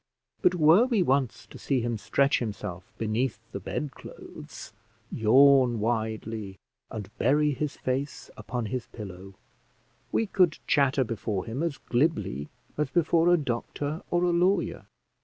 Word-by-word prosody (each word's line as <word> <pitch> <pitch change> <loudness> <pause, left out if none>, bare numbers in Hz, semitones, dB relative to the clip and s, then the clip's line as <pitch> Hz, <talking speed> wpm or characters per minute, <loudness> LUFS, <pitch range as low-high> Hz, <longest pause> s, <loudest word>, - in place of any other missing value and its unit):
But 180 - +4
were 170 +7 +6
we 225 -7 +2
once 130 -7 0
to - - -13
see 135 -3 0
him 120 0 -1
stretch 140 +6 +2
himself 95 -5 -6
beneath 110 +2 -1
the 100 - -5
bed 140 +9 -4
clothes, - - -11 0.4
yawn 130 +1 +5
widely, 110 -2 -2 0.3
and 105 0 -8
bury 150 +4 +3
his 145 +1 -3
face 135 +2 -3
upon 120 -2 -4
his 125 +2 -4
pillow, 95 -3 -9 0.8
we 225 - +1
could 185 -5 +2
chatter 140 -2 +3
before 105 -4 -3
him 120 +6 -4
as 165 -4 -1
glibly 120 - -1 0.3
as 150 -2 +1
before 170 +1 +3
a 175 - +6
doctor 145 +3 -3
or 175 0 +1
a 175 - +3
lawyer. 175 +1 +1
130 Hz, 140 wpm, -27 LUFS, 110-150 Hz, 0.8 s, were